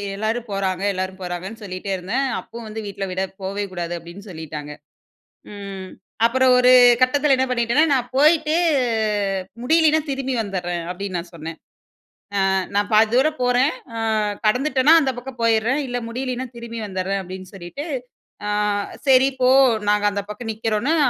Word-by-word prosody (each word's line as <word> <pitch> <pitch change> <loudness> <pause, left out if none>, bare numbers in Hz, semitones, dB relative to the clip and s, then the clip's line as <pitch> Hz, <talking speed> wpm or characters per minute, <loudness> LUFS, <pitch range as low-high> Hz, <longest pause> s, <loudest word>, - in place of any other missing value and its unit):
எல்லாரும் 225 +3 -2
போறாங்க, 190 -1 -1
எல்லாரும் 185 +1 -4
போறாங்கன்னு 185 +5 -6
சொல்லிட்டே 190 0 -5
இருந்தேன். 230 +10 -1
அப்பவும் 230 0 -10
வந்து 220 +1 -6
வீட்ல 200 -1 -4
விட 185 +1 -2 0.2
"போவே 200 +2 -3
கூடாது" 175 -1 -4
அப்பிடீன்னு 175 +5 -11
சொல்லிட்டாங்க. 150 -2 -7 0.8
ம் 195 -2 -7 0.4
அப்புறம் 260 +1 +3
ஒரு 250 0 +5 0.3
கட்டத்துல 275 +2 +3
என்ன 260 0 +1
பண்ணிட்டேனா, 245 +4 +2
"நான் 250 -2 -1
போயிட்டு, 310 +1 +4 1.1
முடியலீனா, 315 +2 +4
திரும்பி 265 -1 -2
வந்துடுறேன்" 175 -4 -3
அப்பிடீன்னு 185 -1 -4
நான் 170 +1 -8
சொன்னேன். 165 0 -7 0.9
அ 190 - +2 0.2
"நான் 205 0 +1
பாதி 215 0 +5
தூரம் 305 +4 +2
போறேன். 250 +4 +3 0.3
அ - - -3 0.5
கடந்துட்டேன்னா, 265 +5 +3
அந்த 265 -2 0
பக்கம் 250 0 -10
போயிடுறேன். 230 +5 +2
இல்ல, 245 0 -2
முடியலீனா, 255 +1 -3
திரும்பி 230 -1 -7
வந்துடுறேன்" 190 +1 -2
அப்பிடீன்னு 185 +1 -9
சொல்லிட்டு. 195 - -7 0.6
அ - - -1 0.6
சரி. 265 +1 +6
போ. 250 - +5 0.4
நாங்க 210 0 +2
அந்த 200 0 -2
பக்கம் 225 +2 -5
நிக்கிறோம்ன்னு, 225 +8 0
220 Hz, 145 wpm, -21 LUFS, 190-255 Hz, 1.1 s, சரி